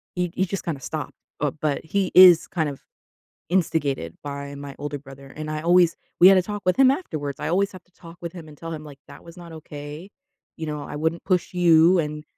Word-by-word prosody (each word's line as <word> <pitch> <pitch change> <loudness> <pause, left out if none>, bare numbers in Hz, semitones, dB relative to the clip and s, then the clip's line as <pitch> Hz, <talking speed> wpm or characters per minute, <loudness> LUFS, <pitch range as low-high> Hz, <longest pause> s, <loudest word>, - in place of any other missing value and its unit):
he 180 -1 -1
he 190 - +1
just 195 +1 -5
kinda 160 -5 -3
stopped. 155 +3 -5 0.3
Oh, 145 -1 0
but 150 -1 -2
he 190 +3 -1
is 180 -3 +8
kind 160 -4 -1
of 140 - -10 0.7
instigated 150 - -1
by 140 0 -6
my 140 -1 -8
older 145 0 -4
brother, 135 0 -13
and 155 +3 -7
I 155 0 -3
always 175 0 +4 0.2
we 180 - +9
had 195 - +7
to 185 - +4
talk 205 +2 -6
with 185 -1 +2
him 270 -1 +6
afterwards. 155 - -3
I - - -3
always 195 +4 +1
have 185 -1 -11
to 180 - -36
talk 170 -1 -14
with 170 -1 -5
him 170 -3 -10
and 150 -1 -14
tell 165 +2 -7
him, 155 -1 -7
like, 145 -2 -12
"That - - -13
was 170 +1 -14
not 170 -1 -11
okay," 150 +2 -9 0.5
you 160 - -5
know, 150 -1 -4
"I - - -7
wouldn't 160 +3 -2
push 185 -2 0
you 175 0 +5
and 150 -1 -3
160 Hz, 235 wpm, -23 LUFS, 145-180 Hz, 0.7 s, we